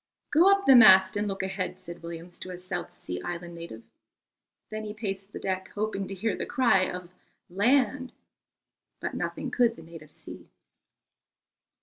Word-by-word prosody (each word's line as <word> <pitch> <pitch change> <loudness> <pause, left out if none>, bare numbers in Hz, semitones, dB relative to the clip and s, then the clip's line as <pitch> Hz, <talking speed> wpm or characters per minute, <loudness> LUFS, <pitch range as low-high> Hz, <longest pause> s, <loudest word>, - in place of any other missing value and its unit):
"Go 345 +6 +6
up 395 0 +2
the 270 - +8
mast 190 -5 +8
and 205 +1 -1
look 195 -1 -3
ahead," 190 -1 -4
said 175 -2 -3
Williams 170 +1 -9
to - - -7
a 180 - -6
South 175 - -6
Sea 90 0 -6
Island 175 0 -6
native. 165 -10 -9 0.9
Then 215 0 -5
he 210 0 -6
paced 195 -2 -5
the - - -7
deck, 190 -1 -3
hoping 205 -2 -2
to 195 - -6
hear 205 +1 -1
the - - -4
cry 240 -8 +3
of 180 -1 -8 0.4
"Land," 255 +6 +2 0.9
but - - -4
nothing - - -4
could 235 -2 +2
the 165 - -13
native 160 -2 -12
see. - - -13
190 Hz, 165 wpm, -27 LUFS, 175-215 Hz, 0.9 s, the